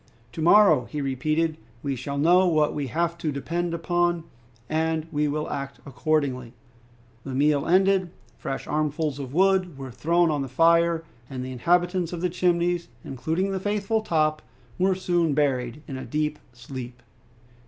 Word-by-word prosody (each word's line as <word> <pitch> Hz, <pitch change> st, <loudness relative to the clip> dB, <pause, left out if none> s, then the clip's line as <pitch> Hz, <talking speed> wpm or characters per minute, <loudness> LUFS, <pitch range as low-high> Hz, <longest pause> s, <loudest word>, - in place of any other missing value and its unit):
"To 160 Hz, -, -6 dB
morrow," 165 Hz, -, +6 dB
he 135 Hz, +6 st, -5 dB
repeated, 155 Hz, +4 st, 0 dB, 0.3 s
"we 140 Hz, -1 st, -1 dB
shall 140 Hz, +3 st, -5 dB
know 175 Hz, +5 st, +5 dB
what 155 Hz, -3 st, +2 dB
we 145 Hz, -2 st, -3 dB
have 170 Hz, +5 st, -1 dB
to 160 Hz, -3 st, -1 dB
depend 170 Hz, +5 st, -2 dB
upon, 175 Hz, 0 st, 0 dB, 0.4 s
and 160 Hz, 0 st, 0 dB
we 150 Hz, -1 st, +1 dB
will 150 Hz, +1 st, -2 dB
act 140 Hz, -1 st, -5 dB
accordingly." 135 Hz, -4 st, -1 dB, 0.7 s
The 135 Hz, -2 st, -5 dB
meal 145 Hz, +1 st, +2 dB
ended, 190 Hz, 0 st, +3 dB, 0.3 s
fresh 135 Hz, -, -5 dB
armfuls 150 Hz, -1 st, -1 dB
of 135 Hz, -3 st, -6 dB
wood 185 Hz, -1 st, +2 dB
were 135 Hz, -2 st, -7 dB
thrown 165 Hz, +7 st, +2 dB
on 145 Hz, -2 st, -1 dB
the 135 Hz, -, -3 dB
fire, 165 Hz, +4 st, +3 dB, 0.3 s
and 130 Hz, -2 st, -5 dB
the 130 Hz, -, -6 dB
inhabitants 175 Hz, +6 st, +1 dB
of 170 Hz, -, -4 dB
the 180 Hz, -1 st, 0 dB
Chimneys, 175 Hz, -1 st, +1 dB, 0.2 s
including 160 Hz, +9 st, -2 dB
the 190 Hz, -, -2 dB
faithful 205 Hz, +2 st, 0 dB
Top, 155 Hz, -6 st, +1 dB, 0.4 s
were 190 Hz, +1 st, +3 dB
soon 175 Hz, -5 st, +1 dB
buried 135 Hz, -2 st, 0 dB
in 135 Hz, -, -5 dB
a 130 Hz, -, -6 dB
deep 150 Hz, 0 st, -2 dB
sleep. 120 Hz, 0 st, -9 dB
155 Hz, 160 wpm, -25 LUFS, 140-175 Hz, 0.7 s, morrow